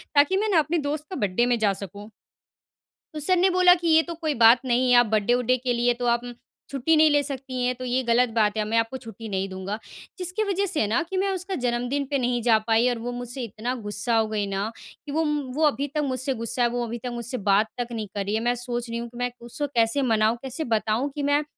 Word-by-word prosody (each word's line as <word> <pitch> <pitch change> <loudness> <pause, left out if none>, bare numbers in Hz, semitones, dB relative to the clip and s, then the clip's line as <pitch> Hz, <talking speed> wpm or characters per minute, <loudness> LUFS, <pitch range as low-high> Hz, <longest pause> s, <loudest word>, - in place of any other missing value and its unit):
ताकि 290 +6 +4
मैं 430 +2 0
ना 360 -5 +4
अपने 310 +3 0
दोस्त 300 +1 -3
का 375 - -5
बर्थडे 205 - +1
में 245 -1 +2
जा 205 -2 +2
सकूँ।" 205 +3 -10 1.0
तो 305 - -5
सर 335 +5 +2
ने 370 +2 +4
बोला 365 -1 +6
कि, 345 -1 -3
"ये 320 0 +6
तो 340 - -6
कोई 315 -2 -2
बात 230 +1 +7
नहीं 250 0 +2
है, - - +6
आप 240 - +6
बर्थडे 215 +1 +1
वड्डे 250 +1 +2
के 250 -1 +1
लिए 240 +1 +2
तो 245 +1 -5
आप 235 - -1 0.5
छुट्टी 280 +4 +1
नहीं 310 0 +6
ले 290 0 +4
सकती 265 -2 -4
हैं, 250 - +1
तो 255 +1 -7
ये 250 +1 0
गलत 240 +1 +3
बात 215 -1 +2
है। 215 - +1
मैं 225 +2 0
आपको 230 +3 0
छुट्टी 225 -3 -10
नहीं 195 -1 -2
दूँगा।" 190 +2 -5 0.4
जिसकी 365 +3 -1
वजह 400 -1 0
से 345 - 0
ना 225 +9 +1
कि 385 - -3
मैं 390 +1 +1
उसका 375 +1 -3
जन्मदिन 245 +4 -1
पे 280 - +2
नहीं 245 -2 0
जा 225 -2 +6
पाई 225 +2 +3
और 245 - -1
वो 245 - -2
मुझसे 245 +1 -5
इतना 235 +3 -4
गुस्सा 205 +3 0
हो 220 -1 +2
गई 215 -1 -2
ना, 195 +2 -2 0.3
कि 290 - -6
वो 320 +3 +1 0.3
वो 315 - 0
अभी 285 -1 -1
तक 300 - +2
मुझसे 260 +1 -1
गुस्सा 230 +2 0
है, 240 - +3
वो 240 0 -2
अभी 235 +1 -5
तक 250 - -3
मुझसे 240 +2 -3
बात 205 +3 +4
तक 240 - -3
नहीं 220 -3 -4
कर 200 -1 -2
रही 205 +2 -1
है। 220 - 0
मैं 245 - +1
सोच 240 0 -3
रही 230 - -3
हूँ 235 - -5
कि 240 - -14
मैं 245 0 -1
उसको 240 +5 -4
कैसे 230 +4 +3
मनाऊँ, 220 +1 +2
कैसे 265 +4 -4
बताऊँ 220 +5 0
कि, 290 - -3
मैं 285 +1 +2
245 Hz, 260 wpm, -25 LUFS, 225-290 Hz, 1.0 s, बात